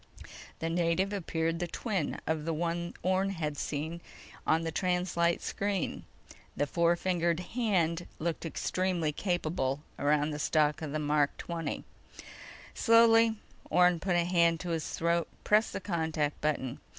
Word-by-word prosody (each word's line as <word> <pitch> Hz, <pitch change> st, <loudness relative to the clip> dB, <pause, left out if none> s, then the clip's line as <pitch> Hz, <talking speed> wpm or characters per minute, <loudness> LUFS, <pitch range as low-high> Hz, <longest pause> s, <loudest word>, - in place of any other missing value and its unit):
The 165 Hz, -, -2 dB
native 175 Hz, +3 st, +1 dB
appeared 165 Hz, -3 st, -1 dB
the 175 Hz, -, -1 dB
twin 195 Hz, -3 st, -2 dB
of 160 Hz, -1 st, -1 dB
the 165 Hz, 0 st, -1 dB
one 170 Hz, +1 st, -2 dB
Orne 190 Hz, +2 st, +2 dB
had 155 Hz, -6 st, -3 dB
seen 155 Hz, +4 st, -4 dB, 0.5 s
on 160 Hz, +1 st, +3 dB
the 165 Hz, -, -2 dB
translite 180 Hz, -1 st, +1 dB
screen. 200 Hz, -3 st, -2 dB, 0.5 s
The 145 Hz, -, +2 dB
four 170 Hz, +3 st, +2 dB
fingered 175 Hz, -2 st, 0 dB
hand 180 Hz, -6 st, 0 dB
looked 165 Hz, 0 st, -2 dB
extremely 175 Hz, 0 st, -1 dB
capable 155 Hz, -5 st, -1 dB, 0.2 s
around 150 Hz, +1 st, +2 dB
the 150 Hz, -, -4 dB
stock 150 Hz, 0 st, +2 dB
of 155 Hz, -3 st, -4 dB
the 155 Hz, -, -1 dB
Mark 150 Hz, -1 st, +1 dB
XX. 170 Hz, -1 st, -4 dB, 0.9 s
Slowly, 230 Hz, -1 st, +5 dB, 0.3 s
Orne 180 Hz, -1 st, +4 dB
put 185 Hz, +1 st, 0 dB
a 175 Hz, -, +3 dB
hand 170 Hz, -2 st, +3 dB
to 180 Hz, -, -5 dB
his 165 Hz, -2 st, -2 dB
throat, 170 Hz, 0 st, 0 dB, 0.2 s
pressed 215 Hz, +2 st, +3 dB
the -, -, -3 dB
contact 160 Hz, -5 st, -1 dB
button. 140 Hz, -4 st, -1 dB
170 Hz, 145 wpm, -30 LUFS, 155-180 Hz, 0.9 s, Slowly